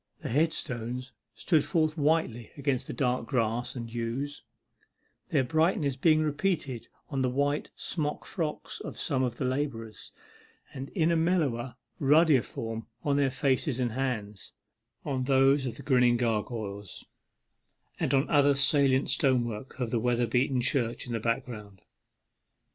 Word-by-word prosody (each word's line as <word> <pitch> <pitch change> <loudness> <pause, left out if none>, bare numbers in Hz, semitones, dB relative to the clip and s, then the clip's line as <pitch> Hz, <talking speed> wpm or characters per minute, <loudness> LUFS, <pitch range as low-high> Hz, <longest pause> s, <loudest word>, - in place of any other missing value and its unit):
The - - -3
headstones 125 -4 -1 0.2
stood 155 +1 +2
forth 155 0 +1
whitely 145 -7 +1
against 140 -3 -1
the - - -4
dark 125 -3 0
grass 120 -1 -1
and 115 -2 -6
yews, 120 +5 -3 0.9
their 140 - +2
brightness 155 -1 +1
being 155 +3 +4
repeated 150 - -1 0.2
on 135 -3 -1
the 130 - +2
white 145 +3 0
smock 150 -3 -3
frocks 160 -4 -4
of - - -7
some 135 -5 -1
of 120 -2 -1
the 130 - -2
labourers, 125 -6 -3 0.6
and 135 0 -6
in 165 -2 +3
a - - +3
mellower, 145 -8 0 0.2
ruddier 150 -1 +5
form 115 -1 -6 0.2
on 145 -1 +1
their 140 -1 +3
faces 130 0 0
and 120 -2 0
hands, 110 -6 -4 0.5
on 130 -2 -1
those 135 0 +4
of 120 - -5
the - - -9
grinning 125 -3 +4
gargoyles, 105 -3 -3 0.9
and - - 0
on 135 +2 +2
other 145 -1 +4
salient 140 -1 +3
stonework 125 -3 0
of 120 -3 -2
the 120 - +1
weather 120 +1 +1
beaten 125 +2 +1
church 120 -2 0
in 120 - -5
the 115 - -1
background. 105 -3 -4
130 Hz, 145 wpm, -29 LUFS, 120-145 Hz, 0.9 s, ruddier